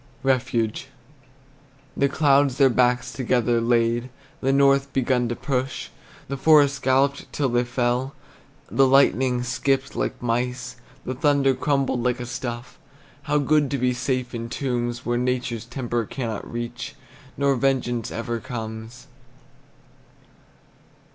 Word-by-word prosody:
REFUGE. 120 Hz, -2 st, 0 dB, 1.1 s
The 140 Hz, -, +2 dB
clouds 140 Hz, -2 st, +3 dB
their 135 Hz, -2 st, +5 dB
backs 125 Hz, 0 st, +1 dB
together 120 Hz, -2 st, +1 dB
laid, 120 Hz, +1 st, +1 dB, 0.3 s
The 135 Hz, -, +2 dB
north 140 Hz, 0 st, +3 dB
begun 125 Hz, -2 st, +1 dB
to 120 Hz, -, -2 dB
push, 130 Hz, 0 st, -3 dB, 0.4 s
The 140 Hz, -, -4 dB
forests 145 Hz, -1 st, +5 dB
galloped 135 Hz, +2 st, +1 dB
till 140 Hz, -3 st, 0 dB
they 120 Hz, 0 st, +2 dB
fell, 125 Hz, +2 st, -1 dB, 0.6 s
The 135 Hz, 0 st, +4 dB
lightning 130 Hz, -2 st, +3 dB
skipped 135 Hz, +3 st, -1 dB
like -, -, -2 dB
mice; 125 Hz, +1 st, -2 dB, 0.3 s
The 130 Hz, -, -2 dB
thunder 140 Hz, 0 st, +2 dB
crumbled 135 Hz, -2 st, 0 dB
like 125 Hz, +1 st, 0 dB
a 125 Hz, -, -4 dB
stuff 120 Hz, 0 st, -6 dB, 0.5 s
How 150 Hz, -, +3 dB
good 145 Hz, 0 st, +2 dB
to 140 Hz, -, -1 dB
be 125 Hz, 0 st, +1 dB
safe 125 Hz, 0 st, -2 dB
in 115 Hz, 0 st, -5 dB
tombs, 120 Hz, -2 st, -2 dB
Where 120 Hz, 0 st, 0 dB
nature's 125 Hz, -2 st, -2 dB
temper 120 Hz, -2 st, -3 dB
cannot 115 Hz, -6 st, -5 dB
reach, 120 Hz, +4 st, -5 dB, 0.4 s
Nor 140 Hz, 0 st, +2 dB
vengeance 125 Hz, -3 st, 0 dB
ever 115 Hz, 0 st, -3 dB
comes! 115 Hz, -1 st, -7 dB
125 Hz, 130 wpm, -24 LUFS, 120-135 Hz, 1.1 s, their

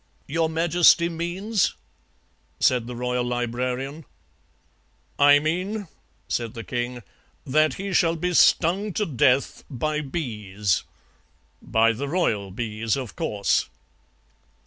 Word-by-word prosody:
"'Your 160 Hz, +2 st, 0 dB
Majesty 170 Hz, +1 st, +4 dB
means 180 Hz, +5 st, -1 dB, 0.4 s
?' -, -, -41 dB
said 125 Hz, -2 st, +2 dB
the 125 Hz, -, -6 dB
Royal 125 Hz, 0 st, -1 dB
Librarian. 125 Hz, +4 st, -3 dB, 1.2 s
"'I 145 Hz, 0 st, +7 dB
mean,' 185 Hz, +7 st, -2 dB, 0.4 s
said 115 Hz, 0 st, -3 dB
the 115 Hz, -, -6 dB
king, 120 Hz, +1 st, -4 dB, 0.4 s
'that 155 Hz, +3 st, +2 dB
he 195 Hz, 0 st, -5 dB
shall 165 Hz, -2 st, +3 dB
be 180 Hz, +2 st, -2 dB
stung 185 Hz, +5 st, +3 dB
to 210 Hz, -, 0 dB
death 135 Hz, -3 st, +1 dB
by 150 Hz, +3 st, -2 dB
bees. 105 Hz, -, -2 dB, 0.8 s
By 115 Hz, +1 st, +3 dB
the 130 Hz, +6 st, -4 dB
royal 115 Hz, -, 0 dB
bees, 110 Hz, +2 st, -2 dB
of 130 Hz, -4 st, -6 dB
course.' 105 Hz, -, 0 dB
140 Hz, 115 wpm, -24 LUFS, 120-170 Hz, 1.2 s, I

